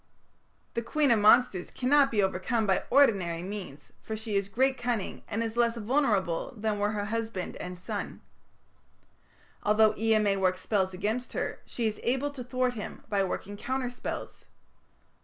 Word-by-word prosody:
The 235 - -1
queen 285 +3 +2
of 230 - +4
monsters 210 -3 +4
cannot 275 +2 +3
be 210 -3 +2
overcome 205 +5 0
by 190 -2 +1
ordinary 195 -11 +3
means, 185 -7 -7
for 220 - -5
she 220 -1 -4
has 200 0 0
great 260 +5 +2
cunning, 240 -5 -2
and 225 +3 -1
is 225 0 -4
less 235 0 +2
vulnerable 225 - 0
than 210 -1 -1
were 205 +1 +1
her 205 -1 -2
husband 220 -3 -3
and 180 0 -6
son. 180 - -5 1.4
Although 215 +1 +4
Ea 225 0 +3
may 205 -2 +2
work 185 -1 +2
spells 190 0 0
against 215 +6 -2
her, - - -3
she 235 - -3
is 215 -1 -1
able 265 +4 0
to 265 -3 -7
thwart 255 0 0
him 215 -4 -7
by 200 -2 +2
working 195 +2 -4
counter 255 +2 -2
spells. 250 - -6
220 Hz, 165 wpm, -29 LUFS, 200-245 Hz, 1.4 s, of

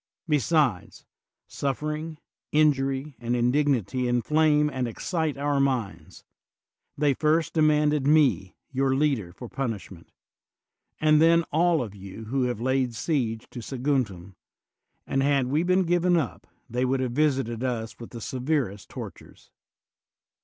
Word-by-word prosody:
Besides, 150 - +1 0.4
suffering, 150 +3 -3 0.3
injury, 140 -2 +1
and 120 0 -1
indignity 125 -2 +1
inflame 150 +5 +3
and 130 -4 -2
ex 115 - -8
cite 160 -5 -1
our 145 0 0
minds: 130 -7 -2 0.7
they 145 -1 +3
first 160 +3 +1
demanded 150 -2 +3
me, 145 -11 +3 0.2
your 135 0 +1
leader, 135 -11 0
for 120 +7 -9
punishment, 110 -9 -5 0.9
and 155 0 +4
then 170 +1 +5
all 165 -1 +3
of 105 -4 -8
you 100 +2 -10
who 130 +3 0
had 120 -3 -2
laid 130 -1 0
siege 115 -4 -1
to 125 - -7
Saguntum; 120 -8 -2 0.7
and 135 - 0
had 140 -1 +2
we 145 +5 +1
been 185 +2 +2
given 175 0 +2
up 145 -8 -3 0.2
they 125 +2 -1
would 130 +1 +1
have 130 -2 -1
visited 130 -4 0
us 115 -3 -3
with 115 - -9
the 115 - -9
severest 130 -5 -2
tortures. - - -10
135 Hz, 130 wpm, -26 LUFS, 120-150 Hz, 0.9 s, then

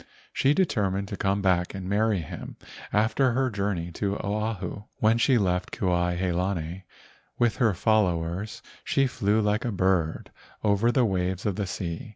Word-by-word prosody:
She 140 +2 +3
determined 100 - +1
to 105 - -4
come 100 +1 0
back 90 -1 +1
and 95 -1 -5
marry 105 -1 +1
him 80 - -8 0.3
after 110 +5 +2
her 130 0 +1
journey 100 -4 -2
to 100 +3 -2
Oahu. 105 -1 -3
When 110 +2 +3
she 130 +1 +4
left 90 -3 0
Kuai 90 -2 0
he 90 0 0
lani 90 0 -2 0.5
with 120 -2 +2
her 110 -6 +2
followers 95 -1 0 0.2
she 135 - +2
flew 105 -4 +1
like 105 +1 +1
a 120 - -1
bird 95 -4 0 0.3
over 105 +3 +3
the 125 -1 +3
waves 95 -2 -1
of 100 -3 0
the 100 -1 -2
sea. 85 +2 -5
100 Hz, 165 wpm, -26 LUFS, 90-110 Hz, 0.5 s, she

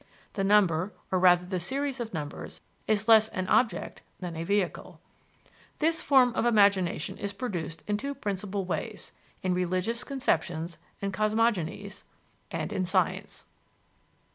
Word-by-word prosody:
The 195 - -1
number, 195 -2 +3 0.2
or 185 - +2
rather 180 -1 +5
the 185 0 -2
series 270 +8 -2
of 230 -2 -4
numbers, 150 -4 -6 0.3
is 215 0 +1
less 220 -1 +7
an 185 -4 -4
object 215 -8 +1 0.2
than 175 -2 -5
a 165 - -3
vehicle. 200 0 -1 0.8
This 325 +1 +1
form 255 -4 +5
of - - 0
imagination 200 -5 +2
is 200 -1 -3
produced 175 -7 -5
in 210 0 0
two 280 +5 -4
principal 200 -5 -3
ways - - -4 0.3
in 185 -1 +1
religious 185 +6 -1
conceptions 175 - -1 0.2
and 195 -1 -1
cosmogonies, 210 -3 0 0.5
and - - -3
in 185 - 0
science. 180 - 0
200 Hz, 140 wpm, -28 LUFS, 180-225 Hz, 0.8 s, less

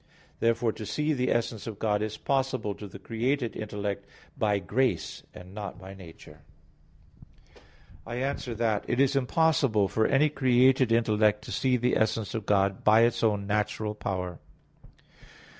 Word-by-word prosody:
(John - - -35
17:3). - - -31 0.2
Therefore 115 0 +2
to 110 - -8
see 150 +1 0
the 125 -2 0
essence 115 -2 -1
of 110 -3 -6
God 105 -1 0
is 110 0 -3
possible 130 -6 -1
to 105 +1 -9
the 100 - -10
created 120 +5 -2
intellect 100 -2 -4 0.3
by 105 -2 +1
grace, 125 +6 -1
and 90 +1 -12
not 100 -3 -6
by 95 +1 -10
nature. 90 -4 -14 1.6
I 120 - -6
answer 130 -2 -3
that, 110 -2 0
It 120 - -1
is 140 0 +3
impossible 135 -6 +2
for 110 +3 +1
any 150 +3 +3
created 130 -2 +3
intellect 105 -2 +2
to - - -9
see 130 -1 +1
the 125 +1 +1
essence 110 -1 0
of 110 -3 -4
God 100 -1 +1
by 110 +1 +6
its 115 0 +2
own 105 -3 +1
natural 105 +1 -1
power. 90 -4 -4
110 Hz, 160 wpm, -28 LUFS, 105-125 Hz, 1.6 s, by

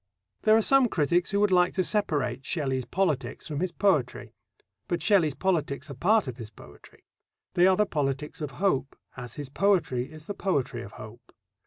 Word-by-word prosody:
There 215 - +5
are 225 - +2
some 270 0 +5
critics 175 -1 +1
who 200 - +1
would 210 -2 +3
like 180 0 +3
to 185 - +2
separate 145 - -1
Shelley's 135 -5 -2
politics 140 - -2
from 150 -3 -4
his 180 +1 -1
poetry. 155 -13 0 0.5
But 175 - -2
Shelley's 175 -9 +3
politics 155 -6 -1
are - - -5
part 195 - +2
of 125 -2 -6
his 115 -4 -8
poetry. 105 - -17 0.5
They 180 +1 +5
are 190 -1 +4
the 210 - +3
politics 145 -2 -3
of 150 - -3
hope 140 -9 0 0.2
as 120 -3 -8
his 145 -3 -6
poetry 155 -8 +1
is 155 0 -12
the 205 - -4
poetry 135 -12 -2
of 100 - -10
hope. 115 +3 -12
155 Hz, 185 wpm, -27 LUFS, 130-190 Hz, 0.5 s, There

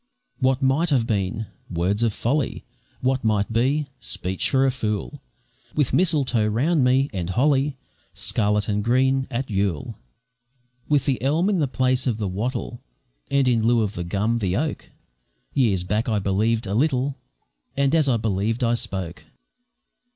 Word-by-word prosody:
What 130 0 +1
might 140 +6 +2
have 130 -6 +2
been! 105 0 -1 0.2
words 90 +5 0
of 115 -1 +2
folly; 135 +7 -1 0.4
What 130 0 +1
might 110 0 +1
be! 135 +6 +2
speech 95 +1 -2
for 135 0 +3
a 135 - +3
fool; 105 -5 -3 0.5
With 145 -4 +1
mistletoe 145 -11 +2
round 135 +8 +2
me, 130 +2 +3
and 90 -3 -3
holly, 135 +5 +2 0.4
Scarlet 105 -1 0
and 105 -1 0
green, 130 +3 +2
at 125 +1 -3
Yule. 95 -7 -2 0.9
With 145 -3 +3
the 135 -3 0
elm 155 +9 +2
in 195 -4 +1
the 145 - +2
place 130 0 0
of 115 -4 0
the 105 -3 -2
wattle, 120 +5 -3 0.5
And 140 -2 +2
in 120 -3 +3
lieu 115 +1 +3
of 105 -1 -2
the 85 - -4
gum, 105 +6 0
the 95 -3 0
oak, 155 +2 -3 0.6
Years 105 -10 +2
back 105 +6 -1
I 110 - +1
believed 105 +4 +1
a 100 - -3
little, 135 +1 +1 0.6
And 140 +1 +2
as 155 -4 +3
I 120 - +3
believed 110 +2 -1
I 120 0 +2
spoke. 90 -8 -4
120 Hz, 160 wpm, -23 LUFS, 105-135 Hz, 0.9 s, for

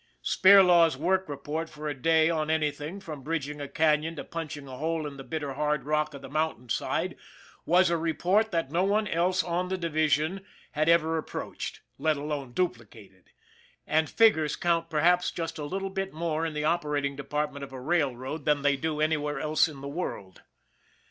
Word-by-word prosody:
Spirlaw's 180 -6 +6
work 190 +4 0
report 150 +3 -4
for 150 0 -7
a 150 - -1
day 160 +4 +3
on 155 -2 0
anything, 155 +3 -1
from 155 -7 -8
bridging 150 0 -3
a 140 - -4
canon 155 +2 +1
to - - -6
punching 150 -4 -6
a 130 -1 -8
hole 160 +2 -2
in 145 -1 -6
the 135 - -8
bitter 150 -2 -4
hard 150 0 0
rock 150 +1 0
of 140 - -10
the - - -7
mountain 155 -4 -2
side, - - -1 0.5
was 180 +1 +4
a 170 - +2
report 180 +6 +1
that 165 -7 -2
no 175 +3 +2
one 210 +2 +1
else 180 +2 +1
on 175 +1 -1
the 190 +1 -2
division 155 +2 0 0.3
had 155 +2 +1
ever 165 -1 +3
approached, - - -6 0.2
let 155 -2 +1
alone 145 -3 -4
duplicated 115 - -5 0.6
and 155 0 +1
figures 160 -10 +4
count 165 -1 0
perhaps 175 +3 +3
just 165 -1 -5
a 150 - -3
little 195 +4 -3
bit 195 0 -3
more 160 0 -2
in 160 - -5
the 150 0 -1
operating 150 -4 0
department 140 0 -3
of 140 - -8
a 130 - -7
railroad 140 -1 -1
than 145 -2 +2
they 145 -1 +3
do 155 +2 -3
any 155 +1 +2
where 145 0 -3
else 155 +1 +2
in 145 -4 -10
the 140 - -6
world. 140 - -5
155 Hz, 190 wpm, -28 LUFS, 145-170 Hz, 0.6 s, Spirlaw's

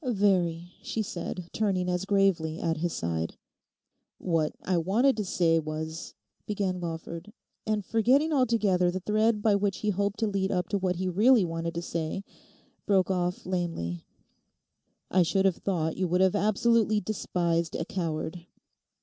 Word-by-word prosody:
'Very,' 185 - +1
she 220 - -2
said, 180 -3 -5
turning 190 -4 0
as 180 +1 -1
gravely 190 -6 +1
at 165 0 -1
his 170 +2 -1
side. 85 - -3 0.8
'What 165 -3 0
I 185 - 0
wanted 225 +11 +3
to 210 - 0
say 170 -3 +2
was—' 160 +1 -5 0.3
began 195 -3 -1
Lawford, 170 +2 -6 0.4
and 210 -2 0
forgetting 265 +8 +3
altogether 215 -9 +2
the 185 +1 -2
thread 215 +2 +1
by 215 - +4
which 200 -1 +1
he 210 - +3
hoped 200 +1 -1
to 220 - +2
lead 195 -1 -1
up 180 -2 -1
to 200 - 0
what 185 -1 0
he 185 +2 -2
really 210 +4 +4
wanted 165 0 -4
to 170 - -3
say, 165 +3 -3 0.6
broke 195 -2 +3
off 180 -1 -1
lamely; 165 - -3 1.1
'I 185 - +4
should 190 +3 +2
have 190 -3 +3
thought 160 -5 -1
you 185 - 0
would 180 +2 +1
have 190 +1 +4
absolutely 215 +1 +2
despised 170 -4 -1
a 165 - -2
coward. 170 -1 -4
185 Hz, 160 wpm, -28 LUFS, 170-205 Hz, 1.1 s, by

